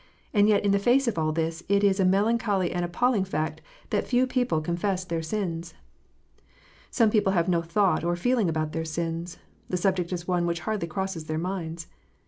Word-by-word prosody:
And 205 -1 +4
yet 205 -1 +3
in 200 - +3
the 200 - +3
face 250 +6 +3
of 210 -8 0
all 155 0 +1
this, 165 +1 -2
it 200 0 +3
is 200 -1 +3
a 190 - +4
melancholy 200 -1 +2
and 175 0 -1
appalling 205 +5 +1
fact 155 -4 -3 0.3
that - - 0
few 250 +1 +3
people 250 -8 0
confess 180 +4 -1
their 165 -2 -2
sins! 170 -2 -4 1.1
Some 225 -3 +3
people 205 -3 +2
have 170 -2 +2
no 175 -2 +2
thought 170 0 +1
or 175 +1 +1
feeling 225 +1 +1
about 155 -1 -1
their 165 0 -2
sins: 165 +1 -4 0.3
the 180 - 0
subject 180 -1 0
is 175 -1 -4
one 175 -2 +1
which 170 0 -2
hardly 215 -6 -2
crosses 185 -1 -4
their 155 0 -3
minds. 170 -2 -4
180 Hz, 195 wpm, -26 LUFS, 165-205 Hz, 1.1 s, And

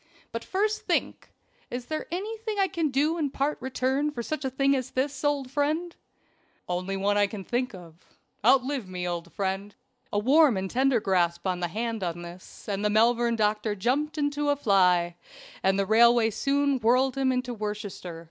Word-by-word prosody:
But 230 0 -4
first 420 +3 0
think - - -1 0.4
is 245 0 -5
there 310 +4 -4
anything 430 +4 -4
I 390 -1 +3
can 330 -3 -1
do 300 +5 +1
in 295 -3 0
part 275 +1 -2
return 265 +3 0
for 240 -5 -5
such 310 +3 -4
a 265 - 0
thing 275 +1 +2
as 255 -2 -3
this, 270 +2 -2
old 285 -3 0
friend?" 310 +5 -1 0.7
"Only 180 +2 -2
one 205 +1 +1
that - - +4
I 205 - +4
can 200 -1 -7
think 245 +1 -2
of. 170 -1 -14 0.4
Outlive 255 -2 +2
me, 180 -1 -4
old 170 -1 -4
friend." 195 +1 -3 0.4
A - - -1
warm 265 +2 +5
and 190 0 -3
tender 260 -1 +3
grasp 175 -4 0
of 185 -1 0
the 175 - -1
hand 225 +3 -3
on 175 -1 -3
this, 175 +2 -12
and 200 -1 -2
the 210 - +2
Malvern 235 +2 +3
doctor 210 -1 0
jumped 275 +10 -1
into 290 0 0
a 285 - +3
fly, 180 -8 +3 0.4
and 190 +1 +2
the 195 - +1
railway 230 +2 +5
soon 280 +3 +1
whirled 250 +3 +3
him 270 -1 +1
into 250 -1 -2
Worcestershire. 205 -5 -5
240 Hz, 185 wpm, -27 LUFS, 195-280 Hz, 0.7 s, warm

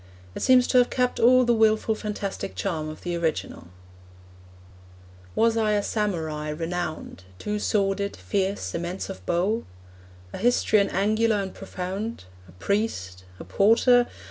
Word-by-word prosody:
It - - -6
seems 255 -1 +5
to 255 - +5
have 245 - +3
kept 250 -1 0
all 255 +2 +6
the 240 - +3
wilful 220 0 +3
fantastic 210 -2 -5
charm 160 -5 -3
of 155 - -9
the 175 -1 -3
original: 160 - -3 1.7
Was 230 0 +3
I 215 -2 +1
a 205 -1 +1
Samurai 160 -9 -2
renowned, 165 - -4
Two 210 - -3
sworded, 200 -1 0
fierce, 195 0 -2
immense 175 +3 -4
of 190 - -10
bow? 195 +7 0 0.7
A - - -6
histrion 220 -4 +3
angular 215 +3 +2
and 195 -2 -3
profound? 195 - -5 0.3
A - - -14
priest? 95 - -2
a - - -7
porter? 240 +4 +4
200 Hz, 140 wpm, -25 LUFS, 175-225 Hz, 1.7 s, all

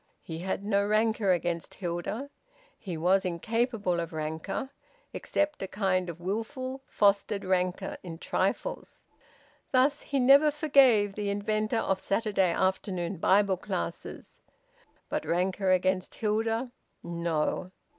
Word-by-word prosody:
He 160 -1 -6
had 190 +2 -3
no 200 -1 +2
rancour 215 0 +1
against 175 -1 -1
Hilda. 185 +10 -4 0.5
He 180 -5 -5
was 185 +4 +3
incapable 205 +1 -1
of 170 -1 -4
rancour, 160 - -4 0.4
except 300 0 -1
a 195 - -3
kind 185 -2 0
of 170 0 -7
wilful, 255 +8 -4
fostered 200 0 +2
rancour 185 0 0
in 170 -3 -8
trifles. - - -2 0.7
Thus 275 +3 +3
he 280 - -1
never 275 +4 +7
forgave 270 -9 +4
the 205 0 -3
inventor 215 +3 0
of 195 -4 0
Saturday 195 -3 +1
afternoon 185 0 -1
Bible 195 +2 +3
classes. - - -5 0.7
But - - -2
rancour 185 +2 0
against 185 0 +1
Hilda! 225 +3 -1 0.3
No! 170 0 -2
195 Hz, 120 wpm, -29 LUFS, 180-225 Hz, 0.7 s, never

